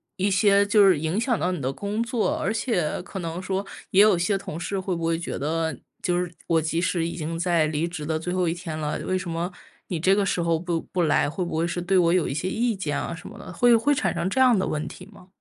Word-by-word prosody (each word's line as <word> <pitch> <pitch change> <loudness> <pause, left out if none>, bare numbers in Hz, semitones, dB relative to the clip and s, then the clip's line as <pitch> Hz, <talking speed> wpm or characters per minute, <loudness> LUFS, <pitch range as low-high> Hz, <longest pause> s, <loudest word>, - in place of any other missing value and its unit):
一 195 +1 0
些 200 +1 +4
就 205 -1 +5
是 185 -4 +5
影 160 +6 -1
响 235 0 +1
到 180 +2 0
你 180 -5 -3
的 130 +1 -1
工 205 +7 -3
作。 235 -1 0
而 220 - 0
且 220 -9 -1
可 190 +2 -7
能 170 0 -4
说， 190 +1 -2 0.3
也 190 - +6
有 210 -3 +6
些 185 +4 +1
同 175 -5 -7
事 195 +3 -3
会 185 -1 -2
不 165 - -5
会 165 0 +1
觉 170 - -4
得， 160 +1 -1 0.2
就 175 -1 0
是 180 -1 -5
我 165 -1 +3
即 160 +2 -1
使 175 -1 0
已 170 - -4
经 165 0 -3
在 170 -2 +2
离 155 +1 -1
职 170 -3 -5
的 160 +1 0
最 165 +3 -4
后 185 -1 +1
1 165 - +1
天 170 -3 -6
了， 150 -1 -2
为 185 - 0
什 185 -1 -5
么 170 +2 -2 0.4
你 175 - -2
这 190 +4 +4
个 200 -1 +2
时 180 - 0
候 170 -1 +2
不 170 0 -2
不 180 - -3
来。 150 -2 +2
会 180 +5 -3
不 165 - -3
会 165 +1 +1
是 175 +1 -3
对 185 +2 +2
我 170 -2 +4
有 180 -3 +2
一 - - -2
些 160 +6 -2
意 230 +4 0
见 160 -7 -2
啊， - - -4
什 165 - -9
么 - - -11
的， - - -9
会 240 +6 +5
会 230 +6 +3
产 290 - 0
生 185 - -1
这 255 - -1
样 250 -4 +6
的 190 - 0
问 155 +1 -2
题 180 +4 -10
吗？ 200 -3 -16
175 Hz, 300 characters per minute, -25 LUFS, 165-195 Hz, 0.4 s, 也